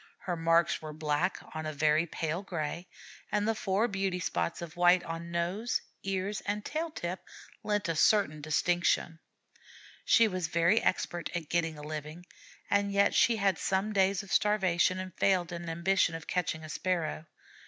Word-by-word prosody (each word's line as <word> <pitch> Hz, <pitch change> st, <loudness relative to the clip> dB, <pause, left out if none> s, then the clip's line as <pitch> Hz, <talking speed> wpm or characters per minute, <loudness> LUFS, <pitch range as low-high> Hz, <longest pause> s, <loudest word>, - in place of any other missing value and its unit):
Her 180 Hz, -, -2 dB
marks 165 Hz, 0 st, +2 dB
were 155 Hz, -1 st, -7 dB
black 155 Hz, +4 st, 0 dB, 0.2 s
on 155 Hz, 0 st, -4 dB
a 155 Hz, -, -3 dB
very 155 Hz, +3 st, +2 dB
pale 160 Hz, +2 st, -3 dB
gray, 170 Hz, -2 st, -4 dB, 0.4 s
and 210 Hz, +1 st, +1 dB
the 225 Hz, -, +3 dB
four 215 Hz, +1 st, 0 dB
beauty 195 Hz, -3 st, -1 dB
spots 170 Hz, -, -2 dB
of 170 Hz, -3 st, -8 dB
white 175 Hz, +1 st, +5 dB
on 165 Hz, +1 st, -6 dB
nose, 175 Hz, +7 st, -1 dB, 0.2 s
ears, 195 Hz, +2 st, -2 dB
and 210 Hz, +1 st, -2 dB
tail 320 Hz, +2 st, -2 dB
tip 180 Hz, -, -5 dB, 0.4 s
lent 210 Hz, -2 st, -1 dB
a 165 Hz, -, -1 dB
certain 160 Hz, -3 st, +3 dB
distinction. 165 Hz, +1 st, +1 dB, 0.8 s
She 230 Hz, -1 st, +5 dB
was 185 Hz, -4 st, -2 dB
very 170 Hz, +6 st, +3 dB
expert 175 Hz, -1 st, -1 dB
at 165 Hz, -3 st, -4 dB
getting 165 Hz, -2 st, 0 dB
a 150 Hz, -, -9 dB
living, 155 Hz, +3 st, -6 dB, 0.4 s
and 200 Hz, 0 st, +1 dB
yet 200 Hz, 0 st, +3 dB
she 235 Hz, -, +4 dB
had 195 Hz, -4 st, +1 dB
some 195 Hz, +3 st, 0 dB
days 195 Hz, 0 st, +2 dB
of 200 Hz, -, -7 dB
starvation 185 Hz, -4 st, +2 dB
and 185 Hz, -1 st, -6 dB
failed 185 Hz, -3 st, +2 dB
in 170 Hz, 0 st, -5 dB
her -, -, -5 dB
ambition 170 Hz, 0 st, +1 dB
of 165 Hz, -, -7 dB
catching 165 Hz, -3 st, -2 dB
a 155 Hz, -, -8 dB
Sparrow. 165 Hz, -1 st, -2 dB
175 Hz, 175 wpm, -30 LUFS, 165-195 Hz, 0.8 s, white